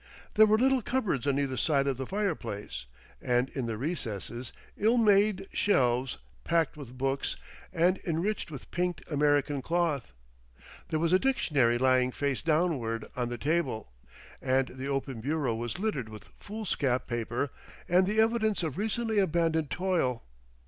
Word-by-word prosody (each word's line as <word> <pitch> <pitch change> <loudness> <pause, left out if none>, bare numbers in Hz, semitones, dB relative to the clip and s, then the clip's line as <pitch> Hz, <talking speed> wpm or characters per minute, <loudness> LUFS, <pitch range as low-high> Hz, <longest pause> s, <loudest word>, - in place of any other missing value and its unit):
There 215 0 +7
were 215 +1 +4
little 265 +2 +3
cupboards 205 - -1
on 140 -1 +2
either 135 -2 -1
side 140 -1 +2
of 135 -3 0
the 130 - -4
fireplace, 115 - -3 0.3
and 125 +1 +1
in 130 -4 -3
the 115 -2 -3
recesses, 120 - -4 0.2
ill 225 +4 +3
made 205 -3 +4
shelves 125 -9 +2 0.3
packed 165 -2 +1
with 130 -4 -10
books, 135 +1 -1 0.4
and 180 +3 +2
enriched 175 +5 -1
with 140 -5 -9
pinked 180 0 -1
American 145 -1 +2
cloth. 165 - 0 0.8
There 155 - -1
was 165 +2 +1
a 185 - +6
dictionary 145 - +2
lying 130 0 +3
face 140 0 -1
downward 150 -9 0
on 125 -2 -1
the 120 - -4
table, 140 - -1 0.5
and 130 0 +1
the 130 +2 -6
open 135 -4 -2
bureau 140 -1 0
was 120 +6 -4
littered 180 - -2
with 110 -1 -12
foolscap 175 - -1
paper 120 +3 -2 0.4
and 180 +2 +4
the 215 +2 +1
evidences 220 -3 +2
of 160 +1 -3
recently 220 0 0
abandoned 165 -4 +1
toil. 175 -10 0
145 Hz, 150 wpm, -29 LUFS, 125-185 Hz, 0.8 s, There